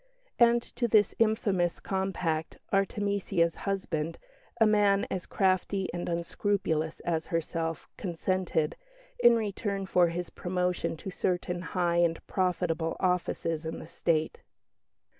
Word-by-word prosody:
And 235 0 +5
to 240 - +2
this 210 -2 +4
infamous 205 -6 +2
compact 180 -5 -2 0.2
Artemesia's 195 -3 +1 0.2
husband, 170 -5 -2 0.4
a 225 - +7
man 205 -2 +4
as 185 -2 -3
crafty 190 0 +1
and 175 0 -3
unscrupulous 170 -2 -1
as 165 -2 -1
herself, 165 0 -2
consented, 175 -3 -1 0.4
in 240 0 +7
return 200 -2 -2
for 180 -2 +4
his 170 +1 -4
promotion 180 -2 -1
to 190 - -6
certain 180 -1 -1
high 175 -2 0
and 170 -1 +1
profitable 175 -3 0
offices 170 -3 0
in 160 0 -4
the - - -8
State. 165 -2 0
180 Hz, 120 wpm, -29 LUFS, 165-195 Hz, 0.4 s, a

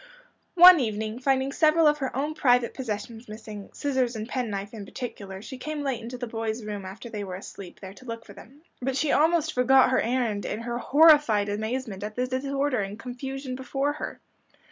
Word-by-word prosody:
One 360 -1 +10
evening, 220 -1 -2
finding 265 +1 +1
several 315 +3 +4
of 300 0 +4
her 265 -3 -3
own 290 +4 -1
private 245 -5 +2
possessions 225 -1 -6
missing 215 -2 -9
scissors 260 -4 -1
and 220 0 -5
pen 250 -2 -2
knife 200 +1 -5
in 215 -3 -7
particular 200 -4 -7
she 260 +2 -8
came 305 +2 -4
late 270 -4 -2
into 240 +2 -7
the 245 - -4
boys 225 0 -4
room 205 -2 -5
after 195 +6 -8
they 210 -3 -5
were 185 -2 -6
asleep, 190 -1 -10
there 190 -1 -8
to 255 - -16
look 230 -1 -7
for - - -12
them. 280 +6 -16 0.2
But 260 +1 -1
she 290 +1 +1
almost 320 0 +3
forgot 260 +1 +5
her - - +3
errand 230 -4 -1
in 215 - -4
her 240 0 -3
horrified 290 -9 +5
amazement 220 -1 -3
at 210 0 -5
the 250 - 0
disorder 275 +1 -1
and 200 +1 -4
confusion 260 +2 -6
before 270 +3 -2
her. - - -6
245 Hz, 200 wpm, -26 LUFS, 215-270 Hz, 0.2 s, One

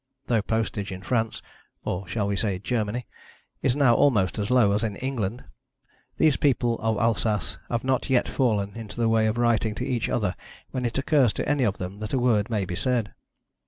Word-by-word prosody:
Though 115 -3 +2
postage 110 -2 -2
in 95 0 -7
France 115 +1 -1 0.4
or 90 +1 -3
shall 105 +3 -1
we 100 0 0
say 100 -2 -1
Germany? 110 +3 -2 0.6
is 130 - +2
now 140 -5 +5
almost 110 - +3
as 100 - -2
low 125 -5 +4
as 105 +2 +1
in 105 -3 -2
England, 120 -2 -3 0.7
these 155 -3 +4
people 120 -4 +1
of 110 -1 0
Alsace 110 -2 0
have 120 -1 -1
not 130 +1 0
yet 130 -2 +3
fallen 105 -6 0
into 115 0 -8
the 115 - +3
way 110 -1 +3
of 110 +2 -1
writing 115 -2 +2
to 125 - -3
each 125 -4 -1
other 105 -6 0 0.4
when 125 -1 -2
it 120 - -4
occurs 135 -5 +3
to - - -3
any 145 -3 +2
of 105 -2 0
them 95 +2 -6
that 105 +2 -5
a - - +3
word 120 -3 +2
may 105 -4 0
be 90 -1 -4
said. 120 -1 -1
115 Hz, 200 wpm, -25 LUFS, 105-125 Hz, 0.7 s, now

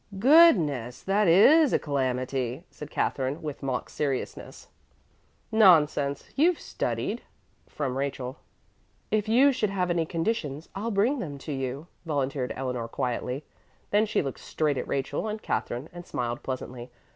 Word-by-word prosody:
"Goodness! 190 - +5
That 200 +1 +2
is 275 - +6
a - - +5
calamity!" 130 -1 -2
said 150 - -9
Katherine 135 +2 -1
with 150 -2 -5
mock 130 -3 -2
seriousness. 140 -3 -4 0.8
"Nonsense! 150 -9 +4
You've 330 +4 +3
studied," - - -3 0.5
from 135 -4 -3
Rachel. 135 -1 -3 0.7
"If 215 0 +1
you 265 +5 +6
should 215 -5 0
have 180 -2 -1
any 165 -2 0
conditions, 165 -4 -2
I'll 210 +4 -3
bring 230 +7 +2
them 145 -9 -5
to 150 - -7
you," 135 +2 -4 0.2
volunteered 140 -5 -2
Eleanor 125 -3 -3
quietly. 125 +3 -3 0.5
Then 210 +2 +3
she 215 - 0
looked 135 -2 -5
straight 150 -4 -1
at - - -5
Rachel 140 +8 -2
and 215 0 -3
Katherine 125 -8 -3
and 175 0 -8
smiled 120 -3 -3
pleasantly. 130 -1 -6
150 Hz, 140 wpm, -27 LUFS, 130-200 Hz, 0.8 s, is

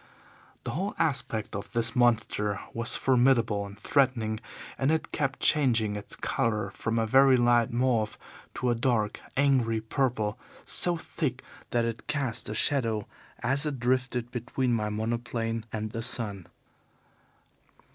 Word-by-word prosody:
"The - - -3
whole 195 +6 -3
aspect 135 -10 -1
of 100 +1 -6
this 115 -1 +1
monster 110 -4 +2
was 115 +1 +2
formidable 120 -6 +2
and 100 +1 -12
threatening, 115 -4 +1 0.4
and 135 - +2
it 160 0 0
kept 135 -3 -1
changing 115 -8 +3
its 105 -1 -4
colour 105 -3 -1
from 115 +3 -2
a 115 - +2
very 130 +3 +6
light 120 -1 +3
mauve 120 -3 +1 0.4
to 125 - 0
a - - +3
dark, 115 -3 0 0.2
angry 130 -5 +3
purple 110 -2 -1 0.3
so 175 -1 +3
thick 140 -6 -3 0.3
that 120 -1 +1
it 115 -1 -5
cast 140 -8 -1
a 105 - -3
shadow 115 -5 +1 0.4
as 135 +3 +2
it 140 -4 -3
drifted 125 -1 0
between 125 +1 -1
my 105 -2 0
monoplane 115 +1 -2
and 110 -1 -4
the 115 - -4
sun. 105 -6 -3
120 Hz, 140 wpm, -28 LUFS, 110-130 Hz, 0.4 s, very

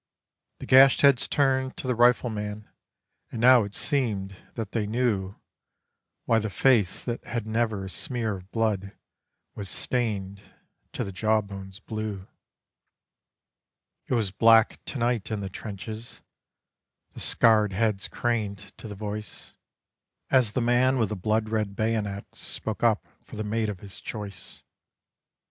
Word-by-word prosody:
The - - -8
gashed 135 +1 +7
heads 140 -4 +5
turned 130 -2 +1
to - - -6
the 130 - +1
Rifleman, 110 -3 +1 0.6
and 115 - -5
now 125 0 +7
it 100 0 -7
seemed 105 -9 -1 0.2
that 110 -4 -4
they 110 -3 -1
knew 105 -4 0 0.9
Why 115 - +3
the 110 0 -3
face 105 -1 +2
that 120 -1 -4
had 115 -2 -4
never 110 -3 -1
a - - -6
smear 115 -3 -2
of 95 +1 -15
blood 105 -4 -1 0.6
was 100 -2 -5
stained 100 -6 -2 0.5
to - - -2
the 100 - -5
jawbones 100 -1 -1
blue. 105 -3 -5 1.8
"It - - +1
was 110 -5 0
black 115 +3 +4
to - - -5
night 120 -3 0
in 110 -2 -2
the 95 - -4
trenches." 110 +3 -8 0.9
The - - -11
scarred 110 -3 +4
heads 105 -1 0
craned 105 -4 -2
to - - -8
the 105 - -7
voice, 105 +1 -7 0.8
As 125 -5 +4
the 125 - 0
man 125 +2 +3
with 110 -5 +1
the 105 - -3
blood 110 +3 0
red 105 -3 -1
bayonet 105 -3 -1
spoke - - -5
up - - +2 0.2
for - - -12
the 110 - -3
mate 110 +1 -1
of 100 -4 -6
his 100 -2 -9
choice. 105 -3 -8
110 Hz, 145 wpm, -26 LUFS, 100-120 Hz, 1.8 s, gashed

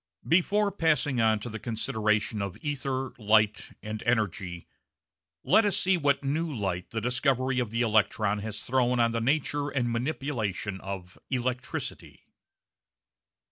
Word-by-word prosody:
Before 200 +4 +3
passing 150 - +1
on 110 -1 +3
to 120 - -5
the 110 0 -6
consideration 110 -2 0
of 100 -2 -4
ether, 135 -2 -2
light, 110 -1 +2
and 110 0 -5
energy, 95 -7 -1 0.8
let 225 - +5
us 205 -2 +1
see 190 0 +3
what 145 -4 +1
new 155 +4 -1
light 95 -8 -3
the 110 - -2
discovery 130 +2 +1
of 120 -3 -1
the 115 +2 0
electron 105 -1 +2
has 105 0 -5
thrown 125 -1 +1
on 115 0 +3
the 115 0 -1
nature 145 +2 0
and 125 -4 -1
manipulation 115 - -2
of 95 -2 -7
electricity. 125 -1 -4
120 Hz, 140 wpm, -28 LUFS, 105-140 Hz, 0.8 s, let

